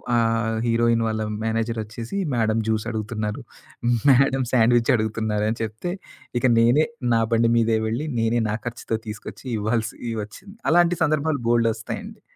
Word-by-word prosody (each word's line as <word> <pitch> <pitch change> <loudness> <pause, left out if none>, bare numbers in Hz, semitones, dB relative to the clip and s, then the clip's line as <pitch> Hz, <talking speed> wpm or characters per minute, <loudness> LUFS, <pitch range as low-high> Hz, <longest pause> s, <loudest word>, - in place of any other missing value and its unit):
ఆ - - +4 0.5
హీరోయిన్ 115 0 +2
వాళ్ళ 110 0 -2 0.2
మేనేజర్ 115 +1 -1
వచ్చేసి 115 - -6 0.2
"మేడమ్ 115 -1 +1
జూస్" 110 -1 0
అడుగుతున్నారు. 110 -1 -3 0.7
మేడమ్ 135 0 +4
శాండ్విచ్ 120 0 +4
అడుగుతున్నారుని 110 0 -1
చెప్తే 110 +11 -4 0.5
ఇక 120 - -1
నేనే 120 +7 +4 0.3
నా 115 - +4
బండి 115 0 +3
మీదే 115 -1 +3
వెళ్ళి 120 +8 -2
నేనే 115 +1 +2
నా 105 - 0
ఖర్చుతో 120 -1 -3
తీసుకొచ్చి 105 +5 -8
ఇవ్వాల్సొచ్చింది. 110 - -4 0.2
అలాంటి 175 +1 +4
సందర్భాలు 155 -2 +1
బోల్డొస్తాయండి. 115 -1 -1
115 Hz, 125 wpm, -23 LUFS, 110-120 Hz, 0.7 s, ఆ